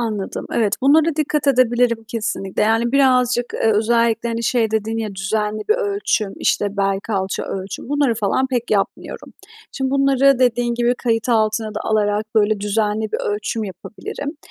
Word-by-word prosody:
Anladım. 215 -4 -3
Evet. 215 -3 +1
Bunlara 305 +3 +4
dikkat 300 -1 -1
edebilirim 245 -3 +2
kesinlikle, 220 -4 -3
yani, 225 +3 +1
birazcık, 250 -3 +3
eee, 220 - +2
özellikle, 230 +1 +1
hani, 230 0 -3
şey 230 -1 +1
dedin 220 +1 -1
ya, 215 -3 -4
düzenli 210 +2 -2
bir 435 - +6
ölçüm, 400 - -1
işte, 205 0 0
bel, 195 -1 +1
kalça 195 -3 -2
ölçüm 195 +4 -6
bunları 285 -4 +1
falan 220 +4 0
pek 245 -3 -3
yapmıyorum. 200 -2 -2 0.4
Şimdi 265 -1 -2
bunları 275 -1 +3
dediğin 245 -1 +1
gibi 240 +1 +1
kayıt 225 0 0
altına 220 -1 +1
da - - -3
alarak, 210 -1 0
böyle, 215 -1 +2
düzenli 210 +1 -1
bir - - 0 0.2
ölçüm 215 +1 -3
yapabilirim 280 - -7
225 Hz, 155 wpm, -20 LUFS, 210-250 Hz, 0.4 s, bir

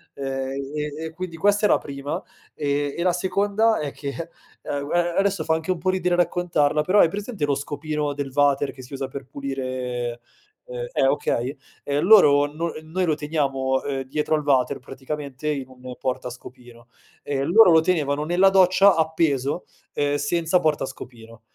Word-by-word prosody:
Ehm, 135 -1 -3 0.2
e 150 +1 -4
e 160 - -6
quindi 170 0 -7
questa 205 +3 +3
è - - -5
la - - +5
prima. 140 0 -5 0.4
E 145 -1 -1
e 170 - -1
la 180 -1 +3
seconda 200 +5 +1
è 145 -2 -3
che, 140 +4 -6 0.3
guar 170 +5 -1
adesso 195 -4 +1
fa 160 - +1
anche 160 +2 -3
un 185 - -1
po' 185 +3 0
ridere 180 -1 0
raccontarla, 170 -4 +1
però 185 +7 +3
hai 165 - +5
presente 205 -2 -3
lo 140 -1 0
scopino 150 0 -3
del 140 -1 -5
vater 140 0 +2
che 130 - -12
si 130 +2 -12
usa 135 0 -3
per 135 0 -7
pulire 130 -3 -4 0.4
uhm - - -8 0.2
eh, - - +2
okay, 130 +5 -1 0.3
ehm, 145 +1 -1
loro 150 -9 +7
no 160 +3 -3
noi 170 +4 -2
lo 160 -3 +1
teniamo, 135 -3 -1
ehm, 135 -1 -3
dietro 150 +4 -1
al 150 - -2
vater, 135 -3 +2
praticamente 140 +2 -6
in 140 -3 -2
un 130 -1 -10
portascopino, 125 -1 -7 0.4
e 135 -1 -2
loro 180 +6 +6
lo 160 -1 +6
tenevano 150 -4 0
nella 175 +4 +4
doccia 190 +1 +5
appeso, 160 -2 0 0.3
uhm, 145 0 +1
senza 165 +4 +1
portascopino. 125 -6 -4
145 Hz, 170 wpm, -23 LUFS, 135-170 Hz, 0.4 s, loro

